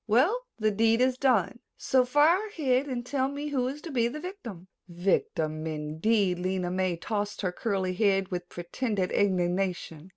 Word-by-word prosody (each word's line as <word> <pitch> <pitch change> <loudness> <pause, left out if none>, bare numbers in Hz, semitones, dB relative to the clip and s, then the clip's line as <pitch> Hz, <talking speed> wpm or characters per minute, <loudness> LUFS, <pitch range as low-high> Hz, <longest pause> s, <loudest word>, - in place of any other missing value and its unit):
"Well, 350 - +2
the 215 -1 +1
deed 225 +2 +3
is 255 0 +3
done, 250 -3 +2 0.2
so 260 -1 +2
fire 310 +10 +3
ahead 280 -9 0
and 245 -3 -4
tell 265 0 0
me 285 +2 -4
who 260 -3 0
is 280 +3 -5
to 330 - -6
be 235 -3 +2
the 265 +6 -5
victim?" 245 - -8 0.2
"Victim, 165 -3 -1
indeed." 175 +6 0
Lena 185 -1 -1
May 185 -2 0
tossed 205 +3 -3
her 185 -3 -1
curly 190 -2 -1
head 195 -1 +2
with 180 -2 -5
pretended 190 +2 -2
indignation. 180 -3 0
210 Hz, 165 wpm, -28 LUFS, 180-260 Hz, 0.2 s, deed